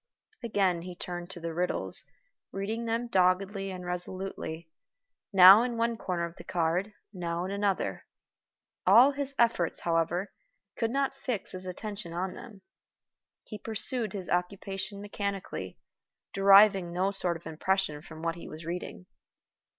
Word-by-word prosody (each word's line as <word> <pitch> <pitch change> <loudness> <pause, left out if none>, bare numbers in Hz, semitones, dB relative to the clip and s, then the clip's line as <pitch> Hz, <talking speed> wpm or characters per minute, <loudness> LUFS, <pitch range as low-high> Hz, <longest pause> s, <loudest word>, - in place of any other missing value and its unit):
Again 195 -7 +1
he 180 +1 -8
turned 175 0 -4
to 190 - -7
the 165 -1 -5
riddles, 180 +2 +2 0.5
reading 220 +4 -3
them 230 +1 -1
doggedly 195 0 +1
and 180 -1 -7
resolutely, 180 -2 -5 0.6
now 195 +2 +9
in 240 -1 -2
one 230 0 +1
corner 180 -6 -2
of 170 0 -10
the - - -10
card, 175 +4 -1 0.2
now 175 -1 -3
in 190 - -4
another. 200 -1 -1 0.8
All 235 +9 +8
his 280 0 -2
efforts, 230 -8 +1
however, 170 +3 0 0.4
could 230 - -1
not 275 +2 -1
fix 255 -6 -4
his 185 0 -8
attention 200 -1 -6
on 180 +2 -3
them. 205 -5 -12 0.8
He 215 - -9
pursued 225 0 -1
his 190 -3 -5
occupation 195 +2 -3
mechanically, 200 -1 -5 0.6
deriving 195 -2 +6
no 185 +3 0
sort 180 -3 +3
of 165 - -22
impression 160 -1 -1
from 160 0 -11
what 165 0 0
he 170 - -10
was 155 +1 -9
reading. 180 +1 -6
190 Hz, 145 wpm, -29 LUFS, 175-210 Hz, 0.8 s, now